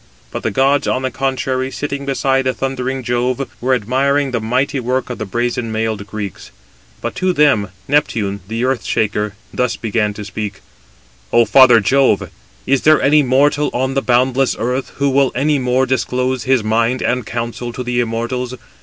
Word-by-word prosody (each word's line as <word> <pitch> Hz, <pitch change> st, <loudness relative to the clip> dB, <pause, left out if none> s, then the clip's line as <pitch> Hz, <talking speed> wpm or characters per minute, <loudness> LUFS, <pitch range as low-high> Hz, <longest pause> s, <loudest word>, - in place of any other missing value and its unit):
But -, -, -4 dB
the -, -, -1 dB
gods 135 Hz, +5 st, +2 dB
on 130 Hz, -, 0 dB
the 130 Hz, -, -1 dB
contrary 130 Hz, 0 st, -1 dB
sitting 140 Hz, 0 st, -4 dB
beside 135 Hz, -1 st, +1 dB
the 130 Hz, -, 0 dB
thundering 130 Hz, 0 st, -3 dB
Jove, 125 Hz, +2 st, -1 dB
were 130 Hz, +1 st, +2 dB
admiring 135 Hz, +5 st, 0 dB
the 120 Hz, -3 st, -1 dB
mighty 130 Hz, +5 st, 0 dB
work 125 Hz, +1 st, -2 dB
of 125 Hz, -, -6 dB
the 110 Hz, -, -4 dB
brazen 120 Hz, +2 st, -2 dB
mailed 110 Hz, -2 st, -2 dB
Greeks; 105 Hz, -4 st, -6 dB, 0.5 s
but -, -, -3 dB
to 185 Hz, 0 st, +1 dB
them 140 Hz, -, +3 dB, 0.2 s
Neptune, 110 Hz, -9 st, 0 dB
the 115 Hz, +3 st, -3 dB
earth 130 Hz, -3 st, 0 dB
shaker, 105 Hz, -1 st, -1 dB, 0.2 s
thus 125 Hz, -2 st, 0 dB
began 105 Hz, -2 st, -1 dB
to 105 Hz, -, -7 dB
speak: 100 Hz, 0 st, -5 dB, 0.7 s
"O 120 Hz, 0 st, +5 dB
father 120 Hz, +2 st, +7 dB
Jove, 135 Hz, +6 st, +2 dB, 0.3 s
is 135 Hz, 0 st, +2 dB
there 155 Hz, 0 st, +5 dB
any 150 Hz, +2 st, +4 dB
mortal 145 Hz, +3 st, +2 dB
on 130 Hz, +2 st, 0 dB
the 135 Hz, -, +1 dB
boundless 130 Hz, +1 st, +2 dB
earth, 125 Hz, +3 st, -2 dB
who 140 Hz, -1 st, +1 dB
will 135 Hz, 0 st, +3 dB
any 145 Hz, +3 st, +1 dB
more 125 Hz, +1 st, +1 dB
disclose 130 Hz, 0 st, -1 dB
his 130 Hz, -3 st, +2 dB
mind 115 Hz, +3 st, +1 dB
and 125 Hz, -3 st, -1 dB
counsel 120 Hz, +1 st, -4 dB
to 125 Hz, +2 st, -5 dB
the 125 Hz, 0 st, -1 dB
immortals? 120 Hz, +2 st, -2 dB
125 Hz, 175 wpm, -17 LUFS, 115-135 Hz, 0.7 s, father